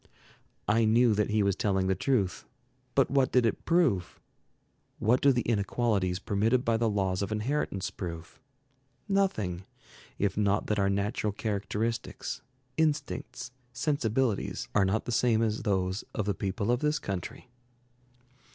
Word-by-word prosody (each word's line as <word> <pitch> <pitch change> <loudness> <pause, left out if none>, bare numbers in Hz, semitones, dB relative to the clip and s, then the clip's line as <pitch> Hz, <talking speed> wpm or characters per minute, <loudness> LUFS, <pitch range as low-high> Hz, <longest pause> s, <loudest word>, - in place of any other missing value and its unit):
I 110 +2 +3
knew 115 +1 +4
that 105 0 +1
he 105 0 +2
was 100 -2 +2
telling 95 -2 +1
the 95 - +2
truth. 100 -2 0 0.5
But - - +3
what 135 -1 +3
did 125 -2 +4
it 115 - -1
prove? 165 - +2 0.8
What 120 +4 +2
do 140 - +6
the 120 -2 +1
inequalities 100 -3 0
permitted 110 +6 +1
by 115 -1 +2
the 115 0 +1
laws 95 -2 0
of 100 - -2
inheritance 110 -3 -1
prove? 85 -3 -7 0.7
Nothing, 110 - 0 0.5
if 100 -1 0
not 105 0 +1
that 105 -1 0
our 100 0 +2
natural 100 +2 0
characteristics, 105 +2 -3 0.4
instincts, 145 -4 -1 0.2
sensibilities, 125 -4 0
are 100 -2 +4
not 100 +4 0
the 120 - -3
same 115 -1 +3
as 110 -1 0
those 95 -2 0
of 105 - -1
the 100 - +1
people 100 +4 -1
of 120 - +2
this 150 +2 +1
country. 110 - -5
110 Hz, 145 wpm, -29 LUFS, 100-125 Hz, 0.8 s, do